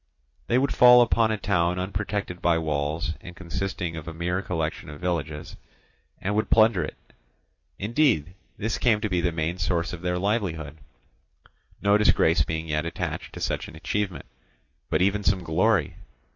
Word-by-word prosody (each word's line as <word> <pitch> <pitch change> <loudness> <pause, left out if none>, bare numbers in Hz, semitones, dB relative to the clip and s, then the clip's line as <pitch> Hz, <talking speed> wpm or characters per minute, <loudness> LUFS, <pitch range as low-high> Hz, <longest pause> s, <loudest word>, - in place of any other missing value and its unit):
They 120 - +2
would 135 +2 +1
fall 125 0 +8
upon 115 -1 +2
a 110 - 0
town 90 -3 +1
unprotected 95 -1 -3
by 85 -2 +3
walls, 80 +2 -1
and 90 - -10
consisting 90 -1 -4
of 80 0 -7
a 80 - -6
mere 90 +3 -1
collection 80 -5 -3
of 75 - -9
villages, 80 -3 -3 0.6
and 100 +2 -2
would 110 +1 0
plunder 110 -5 +4
it; - - -6 0.8
indeed, 110 - +1 0.2
this 110 +2 -2
came 115 -4 +3
to 105 - -1
be 90 -2 +1
the 85 - +1
main 80 +2 -2
source 85 -1 -1
of 85 - -7
their 90 0 -1
livelihood, 90 -7 -2 1.0
no 100 +1 +4
disgrace 80 -7 +4
being 80 +1 -4
yet 75 0 0
attached 85 - -4
to - - -7
such - - -2
an - - -12
achievement, 95 +3 -3 0.6
but - - +2
even 100 +2 +1
some 95 -2 +1
glory. 90 +1 +1
90 Hz, 165 wpm, -25 LUFS, 80-105 Hz, 1.0 s, fall